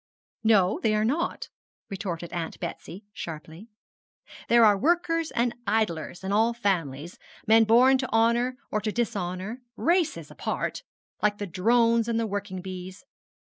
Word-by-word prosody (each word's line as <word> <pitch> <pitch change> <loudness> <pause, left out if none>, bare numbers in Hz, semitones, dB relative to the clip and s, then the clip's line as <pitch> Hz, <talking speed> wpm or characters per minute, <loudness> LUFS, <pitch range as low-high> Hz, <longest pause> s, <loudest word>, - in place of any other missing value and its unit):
'No, 205 -4 +3
they 215 -2 +2
are 215 0 +1
not,' 300 +9 -1 0.4
retorted 175 -3 -5
Aunt 170 -2 -4
Betsy, 180 +3 -7
sharply. 160 +5 -8 0.8
'There 235 -1 +6
are 210 -1 +6
workers 330 - +1
and 235 0 0
idlers 195 -6 -1
in 190 - -3
all 225 +3 +2
families 170 - -2 0.3
men 225 0 +6
born 255 +4 +5
to 260 - -3
honour 235 +3 +2
or 215 - 0
to 215 +1 -2
dishonour 205 0 -3
races 340 +4 0
apart - - -3 0.4
like 210 0 +2
the 205 - -4
drones 230 +5 +2
and 230 -1 0
the 230 - 0
working 200 -3 -4
bees. 185 +5 -8
215 Hz, 140 wpm, -26 LUFS, 185-235 Hz, 0.8 s, There